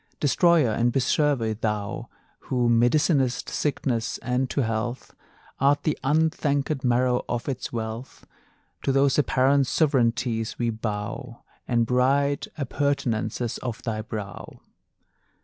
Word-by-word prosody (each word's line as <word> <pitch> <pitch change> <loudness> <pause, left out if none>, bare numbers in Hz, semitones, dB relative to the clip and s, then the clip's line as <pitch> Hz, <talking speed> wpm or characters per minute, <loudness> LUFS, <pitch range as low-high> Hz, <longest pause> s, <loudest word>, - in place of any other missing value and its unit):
Destroyer 155 -2 +4
and 120 +2 +1
preserver, 130 -2 +1
thou 105 -2 -3 0.4
Who 125 -2 +1
medicinest 125 +2 +2
sickness, 125 -6 -1
and 125 +2 0
to 140 - 0
health 115 +2 -3 0.5
Art 140 +1 +3
the 155 - +1
unthankèd 145 -1 +1
marrow 125 0 +2
of 120 -1 -2
its 130 -2 -3
wealth; 115 +2 -6 0.6
To - - 0
those 135 +1 +3
apparent 135 -1 +3
sovereignties 120 -6 +1
we 120 -1 0
bow 110 +3 -5 0.2
And 120 -2 +2
bright 135 +4 +2
appurtenances 125 -5 -1
of 120 -3 -5
thy 110 -2 -2
brow! 105 -3 -7
125 Hz, 115 wpm, -25 LUFS, 115-140 Hz, 0.6 s, Destroyer